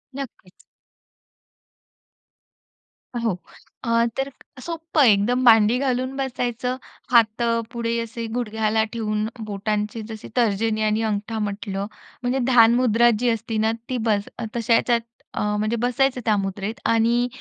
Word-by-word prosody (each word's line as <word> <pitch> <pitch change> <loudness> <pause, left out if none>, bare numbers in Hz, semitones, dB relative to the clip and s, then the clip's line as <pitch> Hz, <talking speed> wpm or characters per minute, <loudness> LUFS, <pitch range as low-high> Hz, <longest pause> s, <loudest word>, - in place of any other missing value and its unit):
नक्कीच. 260 -9 -8 2.7
हो. 225 -4 +1 0.5
अ, 230 -1 +3
तर 270 +1 -1 0.3
सोपं 330 +1 -3
आहे 250 -5 +7
एकदम. 230 +6 +1
मांडी 225 -1 +6
घालून 260 -1 -1
बसायचं. 250 -2 -2 0.3
हात 230 -1 +4
अ, 230 -1 +2
पुढे 235 -1 -2
असे 230 0 -6
गुडघ्याला 220 -2 0
ठेवून 215 -2 -1 0.2
बोटांची 210 +2 -2
जसे 220 -1 -8
तर्जनी 220 -1 +1
आणि 215 +1 +1
अंगठा 215 +2 -3
म्हटलं, 200 -1 -3 0.4
म्हणजे 250 +2 0
ध्यान 235 -1 +7
मुद्रा 240 -1 +4
जी 245 0 +2
असते 225 0 -2
ना 220 +1 +2 0.2
ती 255 - -1
बस 205 -1 +1
अ, 240 - -5
तशा 230 0 +1
ह्याच्यात 235 +1 +3 0.3
अ, - - -2 0.2
म्हणजे 215 +2 0
बसायचं 250 +2 +1
त्या 215 -2 +3
मुद्रेत. 195 +2 -3
आणि 235 +2 +3
230 Hz, 135 wpm, -23 LUFS, 215-245 Hz, 2.7 s, आहे